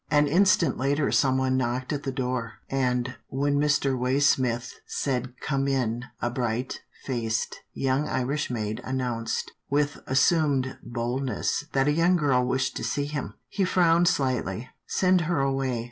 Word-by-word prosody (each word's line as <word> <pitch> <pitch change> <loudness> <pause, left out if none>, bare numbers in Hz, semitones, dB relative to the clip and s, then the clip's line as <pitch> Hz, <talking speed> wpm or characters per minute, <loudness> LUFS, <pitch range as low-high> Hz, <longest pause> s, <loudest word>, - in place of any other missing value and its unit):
An 145 -1 +4
instant 175 +2 +3
later 140 +2 +1
someone 130 -1 +2
knocked 130 +2 -1
at 145 - -2
the 135 - -3
door, 125 -3 -2 0.2
and, 125 -1 0
when 140 +1 0
Mr. 145 -2 +2
Waysmith 125 -2 +1 0.2
said, 125 -2 -2
" - - -28
Come 135 -1 0
in," 125 -3 0
a 120 - -1
bright 120 0 -2 0.2
faced, 115 -4 -2
young 135 +3 0
Irish 140 +3 -1
maid 110 -3 -3
announced, 125 -3 -2 0.2
with 145 0 +1
as 130 0 +3
sumed 140 -4 +2
boldness, 125 +4 -2
that 135 0 +2
a - - +4
young 165 +4 +3
girl 140 -6 +2
wished 130 +1 0
to - - -4
see 145 - -1
him. 145 -2 -4
He 195 - -1
frowned 175 -2 +4
slightly. 125 - 0
" - - -54
Send 185 -1 +3
her 170 - +1
away. 135 -3 0
130 Hz, 160 wpm, -26 LUFS, 125-145 Hz, 0.2 s, An